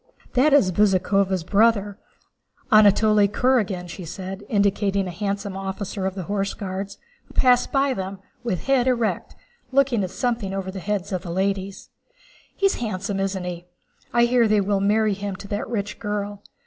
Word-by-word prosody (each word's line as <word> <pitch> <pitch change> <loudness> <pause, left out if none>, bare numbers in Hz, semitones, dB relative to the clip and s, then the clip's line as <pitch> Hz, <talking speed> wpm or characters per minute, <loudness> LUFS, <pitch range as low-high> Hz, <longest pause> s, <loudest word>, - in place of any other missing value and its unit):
"That 275 +4 +4
is 275 -10 +5
Bezúkhova's 190 -1 +2
brother, 205 +1 +2 0.8
Anatole 210 0 +5
Kurágin," 205 -5 +1
she 180 +2 -8
said, 190 +4 -7
indicating 200 -1 +1
a 180 - -4
handsome 200 +1 -3
officer 195 0 -4
of 190 - -4
the 190 - -4
Horse 200 +2 -2
Guards 195 0 -5 0.3
who - - -19
passed 250 -1 +4
by 275 -1 +2
them 195 -2 -5 0.3
with 190 -8 -2
head 265 -2 +2
erect, 235 -3 0 0.4
looking 260 -5 +2
at 185 - -2
something 205 -1 -2
over 190 -1 -3
the 190 - -6
heads 200 +1 -3
of 185 -2 -2
the 175 - -8
ladies. 195 +2 -2 0.7
"He's 390 0 +2
handsome, 200 -3 -3
isn't 195 -1 -2
he? 175 0 -6 0.4
I 235 0 +4
hear 240 -1 +3
they 210 -1 +3
will 200 0 0
marry 210 +1 +2
him 200 0 -4
to 200 +1 -10
that 205 +1 -3
rich 210 -3 -3
girl. 205 -1 -4
200 Hz, 165 wpm, -23 LUFS, 190-220 Hz, 0.8 s, is